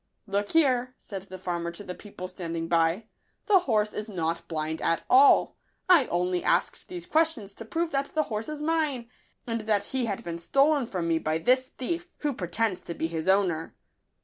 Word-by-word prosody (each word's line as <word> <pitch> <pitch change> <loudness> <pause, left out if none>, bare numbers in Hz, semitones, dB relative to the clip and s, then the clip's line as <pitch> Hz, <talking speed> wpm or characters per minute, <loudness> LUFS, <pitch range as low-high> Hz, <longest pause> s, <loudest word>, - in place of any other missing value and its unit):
Look 205 0 -2
here," 255 -5 +3
said 195 -2 -7
the 185 - -7
farmer 175 -2 -3
to 190 - -9
the 180 - -6
people 185 -2 -8
standing 170 -2 -4
by, 165 +5 +2 0.2
" - - -45
the 405 -3 +6
horse 215 -10 +1
is 215 +1 -5
not 170 -3 -2
blind 160 0 -3
at 165 - +1
all. 270 +2 +6 0.3
I 345 -8 +6
only 180 +1 0
asked - - +1
these 355 -1 -7
questions 315 - +1
to 225 - -10
prove 330 +8 -2
that 275 +1 -2
the 310 - +3
horse 220 0 -4
is 300 -1 -5
mine, 300 -7 0 0.3
and 230 -1 -2
that 205 -2 +3
he 255 -3 0
had 200 -3 -3
been 170 -1 -5
stolen 275 - +3
from 180 -5 -3
me 165 -1 +2
by 155 0 0
this 255 +10 +3
thief, 340 +8 -4
who 295 -2 0
pretends 185 0 -1
to 170 - -7
be - - -2
his 165 +1 -3
owner." 185 -4 +1
210 Hz, 200 wpm, -27 LUFS, 175-275 Hz, 0.3 s, the